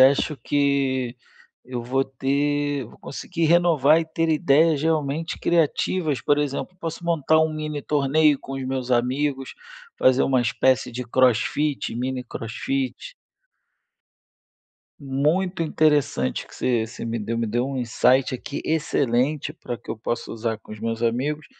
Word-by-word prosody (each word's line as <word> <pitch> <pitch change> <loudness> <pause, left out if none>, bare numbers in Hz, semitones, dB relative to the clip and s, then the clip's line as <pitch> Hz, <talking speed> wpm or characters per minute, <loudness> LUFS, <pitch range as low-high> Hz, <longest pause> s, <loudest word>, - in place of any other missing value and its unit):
Acho 140 +3 +4
que 135 -4 0 0.5
eu 125 -1 -5
vou 135 +3 0
ter 140 +1 -1
vou 110 - -15
conseguir 165 +4 -4
renovar 160 -3 +4
e 165 - -2
ter 165 +1 -1
ideias 155 -1 +3
realmente 160 0 -1
criativas, 165 -2 +1
por 145 0 +2
exemplo, 145 +5 -3
posso 165 +1 -5
montar 160 -2 +3
um 160 0 +1
mini-torneio 150 -1 +1
com 135 - -9
os 135 -1 -4
meus 130 -1 -3
amigos, 130 +3 0 0.5
fazer 130 +1 +4
uma 130 -2 +2
espécie 125 +1 +1
de 125 +2 -4
crossfit, 130 +3 +1
mini-crossfit. 130 - -4 1.9
Muito 155 +7 0
interessante 145 - +1
o - - -22
que - - -15
você 120 -3 0
você 115 - -8
me 115 0 -2
deu, 115 +2 -3
me 115 - 0
deu 120 +4 0
um 135 0 -4
insight 125 +2 +2
aqui 140 +3 -5
excelente 145 -1 0
para 125 -6 -6
que - - -11
eu 110 - -3
possa 120 +1 -3
usar 115 -1 -3
com - - -18
os 110 - -8
meus 115 +1 -3
amigos 140 +6 -1
140 Hz, 145 wpm, -23 LUFS, 125-155 Hz, 1.9 s, Acho